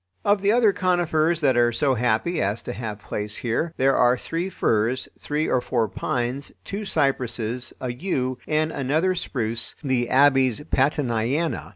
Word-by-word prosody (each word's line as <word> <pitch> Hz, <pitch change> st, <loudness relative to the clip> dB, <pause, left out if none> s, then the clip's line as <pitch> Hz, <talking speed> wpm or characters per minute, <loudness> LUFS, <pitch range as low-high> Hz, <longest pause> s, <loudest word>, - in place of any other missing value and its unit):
Of 205 Hz, -1 st, +3 dB
the 200 Hz, +1 st, +3 dB
other 225 Hz, -3 st, +4 dB
conifers 170 Hz, -3 st, +1 dB
that 135 Hz, -4 st, +3 dB
are 120 Hz, 0 st, +4 dB
so 135 Hz, +3 st, +1 dB
happy 125 Hz, +8 st, 0 dB
as 100 Hz, +3 st, -1 dB
to -, -, -5 dB
have 110 Hz, -1 st, -5 dB
place 105 Hz, 0 st, -4 dB
here, 125 Hz, +8 st, -1 dB
there 135 Hz, +1 st, +3 dB
are 125 Hz, 0 st, +4 dB
three 170 Hz, +8 st, -3 dB
firs, 115 Hz, -, 0 dB
three 150 Hz, +2 st, -1 dB
or 125 Hz, -, +1 dB
four 120 Hz, -2 st, 0 dB
pines, 125 Hz, +6 st, -3 dB
two 205 Hz, +2 st, -5 dB
cypresses, 125 Hz, -, -1 dB
a 125 Hz, -2 st, -3 dB
yew, 130 Hz, -4 st, -2 dB
and 155 Hz, +1 st, +1 dB
another 155 Hz, +8 st, +1 dB
spruce, 115 Hz, -10 st, -2 dB
the 130 Hz, -3 st, 0 dB
Abies 135 Hz, -2 st, +4 dB
Pattoniana. 135 Hz, +2 st, 0 dB
130 Hz, 160 wpm, -24 LUFS, 120-160 Hz, -, other